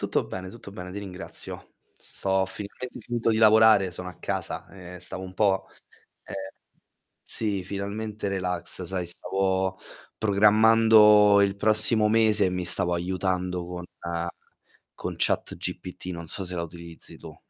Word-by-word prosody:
Tutto - - 0
bene, 95 0 -7
tutto 100 -1 -11
bene, 90 -2 -8
ti 100 - -7
ringrazio. 95 -1 -8 0.2
Sto 95 - -7
ho 95 0 +3
finalmente 105 +6 -8
finito 120 -1 -2
di 110 - +2
lavorare, 110 -3 +6
sono 90 +1 -7
a 90 - -12
casa - - -4 0.3
e - - -10
stavo 95 +1 -3
un 95 0 -9
po 95 -2 +1 0.6
ehm, - - -8 0.9
sì, 100 -4 -2
finalmente 100 +2 -4
relax. 90 -1 -3
Sai, 90 0 -3
stavo 95 +1 -1 0.4
programmando 105 0 +6
il 100 0 +2
prossimo 110 +1 +3
mese 110 -2 +4
e - - +2
mi 90 -1 -3
stavo 90 0 +5
aiutando 90 0 -2
con 90 0 -6 1.1
con - - -5
ChatGPT, 90 - -3
non 85 -2 -6
so 95 +2 -4
se 90 - -6
la 85 - -2
utilizzi 85 0 -11
tu. - - -11
95 Hz, 145 wpm, -26 LUFS, 90-105 Hz, 1.1 s, lavorare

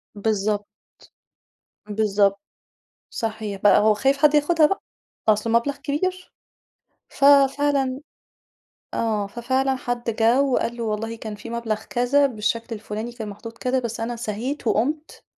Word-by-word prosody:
بالضبط. 205 0 -1 1.2
بالضبط، 200 -1 +2 0.7
صحيح، 215 -3 -4
بقى 205 0 +6
هو 215 0 +4
خايف 270 +6 +1
حد 300 0 +4
ياخدها 305 +2 +4
بقى، 390 +6 -2 0.5
أصله 215 +2 +2
مبلَغ 280 +4 -4
كبير. 365 +6 -3 0.8
ف 275 - 0 0.3
فعلًا 275 -3 +1 1.0
آه، 215 -3 0
ففعلًا 260 +5 0
حد 245 -1 -4
جَه 230 +4 +3
وقال 245 -3 0
له 235 - -4
والله 225 +1 -3
كان 220 -1 -7
في 220 +3 -9
مبلَغ 230 -2 -3
كذا، 270 +4 +2
بالشكل 230 0 -2
الفُلاني 215 +2 -6
كان 225 -3 -7
محطوط 225 +3 -9
كذا، 255 +1 0
بس 235 -2 -4
أنا 235 +1 -3
سَهيت 235 +5 -4
وقُمت 295 +9 -1
230 Hz, 135 wpm, -23 LUFS, 215-265 Hz, 1.2 s, بقى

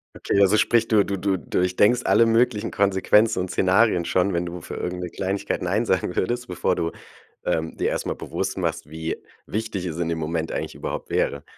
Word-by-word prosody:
Okay, 100 - +1
also 100 +2 +5
sprich 115 +1 +3
du 105 -4 +4
du 100 - -2
du 95 0 0
durchdenkst 90 - +2
alle 115 - +5
möglichen 115 -1 +2
Konsequenzen 100 +2 +3
und 90 0 -2
Szenarien 95 0 +3
schon, 90 +3 +1
wenn 85 0 0
du 90 +1 -6
für - - -8
irgend 90 0 -4
'ne 90 - -4
Kleinigkeit 95 +3 -2
nein 95 +6 0
sagen 90 -3 0
würdest, 120 +6 -1
bevor 90 - 0
du, 85 0 -1 0.5
ähm, 80 0 -1
dir - - +1
erstmal - - -2
bewusst - - -4
machst, - - -2
wie 80 +1 -4 0.3
wichtig 105 -3 -3
es 85 -3 -4
in 85 -1 -1
dem 85 -1 -2
Moment 80 +1 -2
eigentlich - - -4
überhaupt - - -5
wäre. 70 0 0
95 Hz, 195 wpm, -24 LUFS, 85-105 Hz, 0.5 s, also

